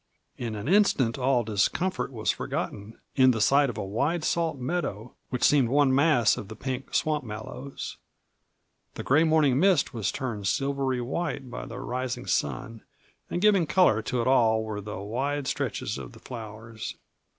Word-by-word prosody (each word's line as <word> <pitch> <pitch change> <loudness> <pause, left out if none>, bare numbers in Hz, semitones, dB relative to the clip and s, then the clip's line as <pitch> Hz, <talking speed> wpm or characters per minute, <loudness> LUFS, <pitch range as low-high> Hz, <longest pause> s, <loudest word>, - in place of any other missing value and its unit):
In 115 -3 -4
an 105 +4 -5
instant 150 - +3
all 125 -1 +2
discomfort 115 - 0
was 110 -4 0
forgotten 105 +2 -5 0.2
in 130 -1 +6
the 115 -3 +2
sight 140 +5 +4
of 115 - -6
a 105 - -3
wide 145 - -1
salt 165 -3 0
meadow 125 - -3 0.2
which 125 - -3
seemed 135 -5 +4
one 140 0 +4
mass 140 -6 +4
of 100 - -6
the 110 - -8
pink 130 +3 -5
swamp 150 -2 +1
mallows. 115 +5 -7 1.0
The - - -5
gray 145 +5 +4
morning 155 -5 +3
mist 185 -4 +3
was 110 -4 -1
turned 110 -7 -4
silvery 135 +2 0
white 135 0 -3
by - - -6
the - - -8
rising 130 0 -3
sun, 90 - -2 0.5
and 175 - -2
giving 200 -6 +4
color 180 - +4
to 120 +2 -1
it 115 - -1
all 110 -4 +4
were 105 -1 -4
the 105 +1 -6
wide 135 +8 -2
stretches 125 -5 -2
of - - -9
the 115 - -14
flowers. 110 -2 -8
125 Hz, 170 wpm, -27 LUFS, 110-145 Hz, 1.0 s, in